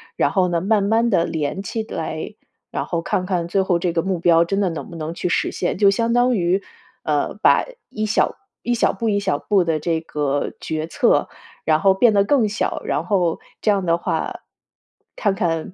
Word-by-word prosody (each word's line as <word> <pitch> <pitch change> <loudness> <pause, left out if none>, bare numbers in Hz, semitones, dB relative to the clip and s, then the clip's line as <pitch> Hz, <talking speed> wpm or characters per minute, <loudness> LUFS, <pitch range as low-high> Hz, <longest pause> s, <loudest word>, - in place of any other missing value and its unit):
然 - - +2
后 185 -2 +2
呢， 170 -1 0
慢 205 +1 +2
慢 225 +3 +2
地 170 -5 +2
连 160 +3 -3
起 225 +2 -3
来， 220 - -5 0.4
然 - - -2
后 170 -2 -2
看 180 +2 -1
看 180 -3 -1
最 190 +2 +1
后 180 -2 +1
这 175 0 0
个 165 - +1
目 190 -2 -1
标 170 0 +4
真 195 +3 -1
的 195 -3 +1
能 165 - -6
不 170 - -10
能 160 0 -4
去 175 - -3
实 170 - 0
现。 175 - -2
就 200 0 +5
相 230 +4 +1
当 245 0 +3
于， 180 +1 +1 0.4
呃， - - 0
把 - - +4 0.2
一 215 -1 -3
小 210 - +1 0.3
一 240 - -1
小 - - +2
步 225 +3 -2
一 200 -1 +1
小 190 -7 0
步 200 -3 +2
的 165 -2 0
这 165 0 0
个 145 -3 -2
决 155 0 -3
策， - - +2 0.4
然 155 -1 +3
后 195 -1 +5
变 220 +3 +4
得 200 -1 +4
更 235 -1 +2
小， 210 - -2
然 - - -1
后 180 -6 +1 0.2
这 215 - +1
样 195 -2 0
的 170 0 +2
话， - - -3 0.8
看 205 -3 +1
看 165 0 -2
185 Hz, 230 characters per minute, -21 LUFS, 170-205 Hz, 0.8 s, 就